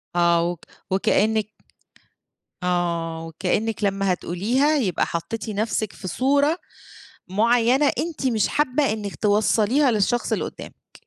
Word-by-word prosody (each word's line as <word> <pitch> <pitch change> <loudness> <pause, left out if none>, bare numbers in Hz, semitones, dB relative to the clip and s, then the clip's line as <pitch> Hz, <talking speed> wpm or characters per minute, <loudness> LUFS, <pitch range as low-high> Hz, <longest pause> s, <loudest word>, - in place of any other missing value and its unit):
آه. 170 -1 +3
وك 175 -2 -5 0.3
وكإنّك 215 +2 +2 1.2
آه، 170 -2 -1
وكإنّك 200 +7 -2
لمّا 195 -1 +1
هتقوليها 240 - 0
يبقى 195 -10 0
حطّيتِ 205 +7 -4
نفسِك 215 0 -2
في 185 - -8
صورة 285 - +2 0.7
معيّنة 235 +7 +3
أنتِ 315 -5 -2
مش 220 -5 +1
حابّة 280 -3 +1
إنِّك 205 -2 -5
توصّليها 220 +5 +2
للشخص 220 +3 0
اللي - - 0
قُدّامِك. - - -11
215 Hz, 115 wpm, -23 LUFS, 180-245 Hz, 1.2 s, آه